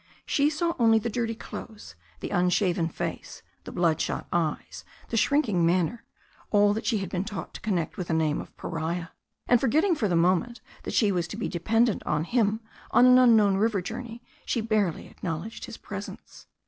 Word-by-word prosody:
She 285 +1 +2
saw 335 +2 -1
only 225 -1 +5
the 230 +1 -2
dirty 230 0 -2
clothes, 215 - -9 0.3
the - - -5
unshaven 180 -1 +1
face, - - -6 0.2
the - - -7
blood 165 -3 +1
shot - - -3
eyes, 165 -3 -2 0.3
the - - -3
shrinking 225 - +2
manner, 180 +6 +1 0.4
all 205 -1 +4
that 220 - -4
she 225 - +2
had 195 -3 -4
been 180 0 -1
taught 205 -2 -6
to - - -9
connect 185 -7 -2
with 180 - -4
the 165 - 0
name 155 -2 +1
of - - -14
pariah; 165 +1 -3 0.4
and, 245 -1 +4
forgetting 315 - +3
for 240 -10 0
the 175 - 0
moment 185 +7 +2 0.3
that - - -3
she 210 -4 +3
was 175 -3 -1
to 205 - -7
be 230 - -2
dependent 225 +6 +1
on 150 0 +1
him 220 +2 +1 0.3
on 245 - +5
an 255 0 +7
un 245 -3 +6
known 200 -3 +4
river 215 0 +1
journey, 230 +4 -7 0.2
she - - -1
barely 215 -6 0
acknowledged 175 +5 -6
his - - -9
presence. - - -9
205 Hz, 190 wpm, -27 LUFS, 175-230 Hz, 0.4 s, an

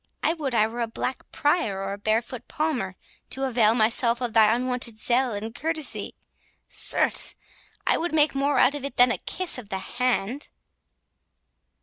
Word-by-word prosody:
I 320 - +2
would 285 -7 -4
I 215 -1 +4
were 235 +2 -5
a 230 - 0
black 250 +3 -5
Prior 260 - 0
or 195 0 -3
a - - -6
barefoot 225 +3 -2
Palmer, 260 - -2 0.3
to 270 - -3
avail 230 -4 +3
myself 235 +1 +2
of 245 -3 -3
thy 220 -1 +5
unwonted 245 -1 -1
zeal 245 +3 +1
and 215 +2 -5
courtesy—certes, 315 +2 0 0.5
I - - +3
would 345 +1 -2
make 305 -1 +3
more 280 +1 0
out 265 - +4
of 290 -2 -6
it 280 -2 -5
than 245 0 +5
a - - -2
kiss 370 -8 -3
of 215 -5 -12
the 190 - -2
hand." 245 +4 -2
245 Hz, 165 wpm, -25 LUFS, 220-275 Hz, 0.5 s, thy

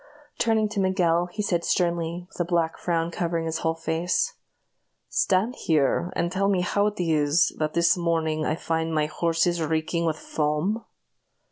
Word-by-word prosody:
Turning 220 -2 +2
to 210 -1 -4
Miguel, 175 -3 +2
he 210 +4 -4
said, 175 -4 0
sternly, 170 0 0
with - - -16
a - - +3
black 170 -1 0
frown 170 -1 -1
covering 170 -1 -2
his 160 0 -2
whole 160 0 0
face: 165 - -1 0.8
"Stand 195 +5 +1
here, 160 +3 +1
and 170 0 0
tell 195 +1 +1
me 190 -3 +2
how 200 +3 +1
it 210 -1 -4
is, 155 -2 +3
that 155 0 -1
this 170 0 +4
morning 165 -3 0
I 155 - 0
find 160 0 -2
my 155 -1 +2
horses 170 +2 0
reeking 160 +2 -1
with 155 -1 0
foam?" 155 +11 -1
170 Hz, 165 wpm, -25 LUFS, 160-180 Hz, 0.8 s, this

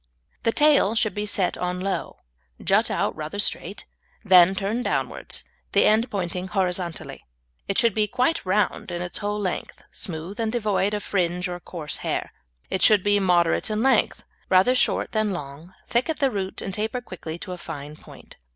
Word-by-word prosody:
The 230 - +2
tail 285 -6 +4
should 220 -1 +2
be 210 0 -3
set 195 -3 0
on 180 0 -2
low, 195 +1 -3 0.4
jut - - +2
out - - 0
rather 155 +5 -5
straight, 205 - -2 0.4
then 185 -1 +7
turn 205 +5 -1
downwards, - - -1 0.3
the - - +5
end 220 +3 +3
pointing 180 -2 -3
horizontally. 180 -2 -2 0.4
It 195 - -1
should 230 -3 +4
be 215 0 +1
quite 255 +8 0
round 200 +1 0
in 175 0 -3
its 175 - -3
whole 210 0 -2
length, 190 -3 -4
smooth 170 +4 -6
and 225 -1 0
devoid 210 -3 0
of 205 - -4
fringe 180 -1 0
or 175 0 -5
coarse 165 -4 -6
hair. - - -3 0.4
It 190 - -2
should 210 -4 +6
be 205 0 +3
moderate 175 -2 +2
in 215 +1 0
length, 265 0 +2 0.3
rather 190 +7 +5
short 255 - +1
than 215 -2 0
long, 155 +2 -8
thick 240 +6 +1
at 320 - -1
the 275 -3 +2
root, 195 -3 -4
and 195 - -4
taper 220 +5 -2
quickly 165 -7 -7
to 185 - -8
a 180 - -5
fine 150 -2 -7
point. - - -15
195 Hz, 180 wpm, -24 LUFS, 180-215 Hz, 0.4 s, then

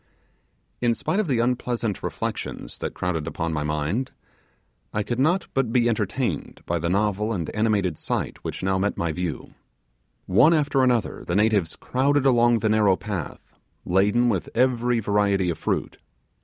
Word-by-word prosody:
In 120 -1 +2
spite 195 - -1
of 215 - 0
the 130 -5 +1
unpleasant 120 -3 -1
reflections - - -5
that - - -4
crowded 80 -4 -2
upon 80 +1 -3
my 75 - -1
mind, 75 - -1 0.8
I 105 - -1
could 120 +3 -3
not 170 +7 +2
but 135 -4 0
be 120 -1 +3
entertained 110 - -2
by 85 0 -1
the 85 +1 -1
novel 105 +3 +1
and 85 -7 -2
animated 105 -6 0
sight - - -3
which - - -5
by - - -1
now 95 0 +1
met 100 +2 -1
my 85 -1 -1
view. 85 -3 -4 0.7
One 155 - +5
after 145 -3 +2
another 125 -5 +1
the 85 - -2
natives 105 -5 +2
crowded 140 +2 +1
along 120 -2 +4
the 110 - 0
narrow 105 -3 +4
path, 95 -6 -6 0.3
laden 105 +7 +3
with 100 -7 -1
every 120 -1 +2
variety 100 -3 +1
of - - -6
fruit. - - -2
105 Hz, 165 wpm, -24 LUFS, 90-120 Hz, 0.8 s, One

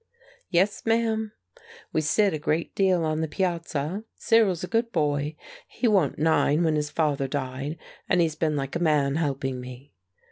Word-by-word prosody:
"Yes, 190 +3 +1
ma'am. 225 -1 +1 0.6
We - - +2
sit 195 +5 +2
a 155 - -2
great 155 +3 -1
deal 185 -4 +2
on 155 0 -1
the 160 - -1
piazza. 170 +1 -2
Cyril's 205 -7 +2
a - - -3
good 230 +2 0
boy; 150 -2 0 0.3
he 250 - -1
wa'n't 190 -10 +2
nine 160 0 +3
when 160 -2 +2
his 150 -1 -1
father 145 -3 0
died; 135 +2 -4 0.3
and 180 - +3
he's 165 -2 +2
been 155 -1 0
like 135 0 -3
a - - 0
man 150 -4 +2
helping 135 -4 -2
me. 125 +1 -11
160 Hz, 170 wpm, -26 LUFS, 145-185 Hz, 0.6 s, nine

